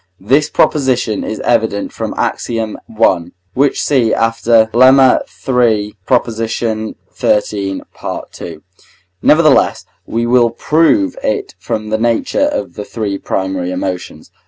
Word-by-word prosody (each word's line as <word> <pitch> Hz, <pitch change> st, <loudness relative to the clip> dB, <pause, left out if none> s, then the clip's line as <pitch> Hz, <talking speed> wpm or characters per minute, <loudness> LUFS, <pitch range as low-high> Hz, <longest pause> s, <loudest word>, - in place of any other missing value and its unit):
This 135 Hz, +10 st, +2 dB
proposition 125 Hz, -7 st, +1 dB
is 110 Hz, -, -4 dB
evident 110 Hz, -4 st, 0 dB
from -, -, -4 dB
Ax. -, -, -2 dB
i. 115 Hz, -2 st, -2 dB, 0.8 s
(which 140 Hz, +1 st, +1 dB
see 125 Hz, -6 st, +2 dB
after 115 Hz, 0 st, +3 dB
Lemma 130 Hz, +1 st, +6 dB, 0.3 s
iii. 115 Hz, -5 st, +2 dB
Prop. 125 Hz, -2 st, +2 dB
xiii., 110 Hz, -3 st, -2 dB
Part -, -, -7 dB
II.). 80 Hz, -3 st, -7 dB, 0.6 s
Nevertheless, 155 Hz, -2 st, +3 dB, 0.2 s
we 115 Hz, +1 st, -1 dB
will 120 Hz, 0 st, +4 dB
prove 165 Hz, -, +2 dB
it 390 Hz, +9 st, -2 dB
from 110 Hz, -1 st, -4 dB
the 110 Hz, 0 st, 0 dB
nature 120 Hz, -, +1 dB
of 295 Hz, -1 st, -3 dB
the 105 Hz, -, -6 dB
three 100 Hz, -2 st, -4 dB
primary 95 Hz, -1 st, -2 dB
emotions. 90 Hz, -1 st, -5 dB
115 Hz, 120 wpm, -15 LUFS, 105-130 Hz, 0.8 s, Lemma